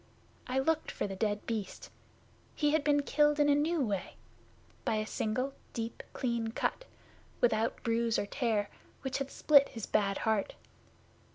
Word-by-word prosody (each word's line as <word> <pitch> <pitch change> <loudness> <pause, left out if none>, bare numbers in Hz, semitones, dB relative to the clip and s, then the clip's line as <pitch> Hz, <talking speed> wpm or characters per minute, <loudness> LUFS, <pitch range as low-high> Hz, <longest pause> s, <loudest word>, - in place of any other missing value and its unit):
I 255 - -1
looked 315 +4 +1
for - - -3
the 195 -1 -4
dead 205 +1 -1
Beast. 215 -4 -4 0.6
He 295 -1 +2
had 310 -1 +2
been 290 -1 +3
killed 295 +1 +3
in 290 0 +4
a - - +6
new 310 +3 +1
way 205 -7 -2 0.7
by - - +1
a 215 0 0
single 255 +5 -2 0.2
deep, 230 0 -4
clean 235 -3 -2
cut, - - -1 0.5
without 225 -1 +1
bruise 230 0 +1
or - - 0
tear, 215 -3 -1 0.3
which 265 0 -2
had 275 0 -3
split 280 -1 +5
his 225 -3 -6
bad 200 -2 +1
heart. 220 -3 0
235 Hz, 160 wpm, -32 LUFS, 215-285 Hz, 0.7 s, a